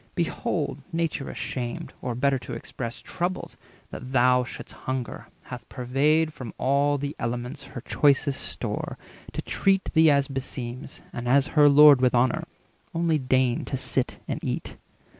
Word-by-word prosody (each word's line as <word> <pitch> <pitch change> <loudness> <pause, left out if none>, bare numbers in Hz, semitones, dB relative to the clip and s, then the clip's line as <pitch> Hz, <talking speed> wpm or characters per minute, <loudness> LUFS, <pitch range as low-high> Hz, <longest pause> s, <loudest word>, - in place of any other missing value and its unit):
Behold, - - -2
Nature 165 -4 -2
ashamed, 120 -2 -4
or, 125 -2 -3
better 135 +2 +2
to 120 - -8
express, 120 -2 -6
Troubled, 180 +1 -3 0.4
that 130 - -7
thou 125 0 +4
shouldst 125 - -9
hunger, 130 -2 -5 0.2
hath 125 -2 -9
purveyed 150 +5 +1
From 125 -7 -8
all 140 +2 +2
the 140 +1 -4
elements 125 +5 -4
her - - -4
choicest 140 0 +2
store, - - -4 0.4
To - - -4
treat 195 -1 +1
thee 160 -1 +6
as 140 -2 +3
beseems, 130 -1 -5
and 120 0 -4
as 135 +2 +4
her 150 -2 +7
Lord 145 -2 +8
With 125 -1 +3
honour. 125 +1 +2 0.5
Only 165 -2 +2
deign 130 -2 +1
to 135 - -3
sit 130 0 -1
and - - -4
eat." - - -3
135 Hz, 150 wpm, -26 LUFS, 125-145 Hz, 0.5 s, Lord